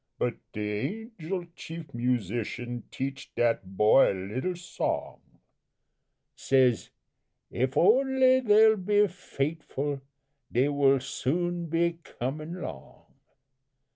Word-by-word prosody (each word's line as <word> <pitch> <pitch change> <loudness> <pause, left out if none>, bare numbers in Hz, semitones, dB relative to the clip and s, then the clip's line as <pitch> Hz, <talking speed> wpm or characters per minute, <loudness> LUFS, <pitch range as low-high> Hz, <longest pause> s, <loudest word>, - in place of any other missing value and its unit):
But 120 - 0 0.2
de 105 - -3
Angel 175 +2 -3
Chief 160 -3 -9
Musician 120 0 -2
teach 135 +1 -5
dat 105 -5 0
boy 105 +5 +6
a - - -3 0.2
little 175 +9 -1
song 175 +1 -3 1.2
Says 130 -4 +2 0.6
'If 130 +2 -1
only 260 +5 +5
dey 220 -1 +6
be 205 +1 +3
fait'ful 145 -5 -3 0.5
dey 130 +4 +2
will 140 -1 +4
soon 170 +6 -2
be 170 +1 0
comin' 155 +8 -5
'long.' 65 - -10
145 Hz, 100 wpm, -28 LUFS, 125-180 Hz, 1.2 s, boy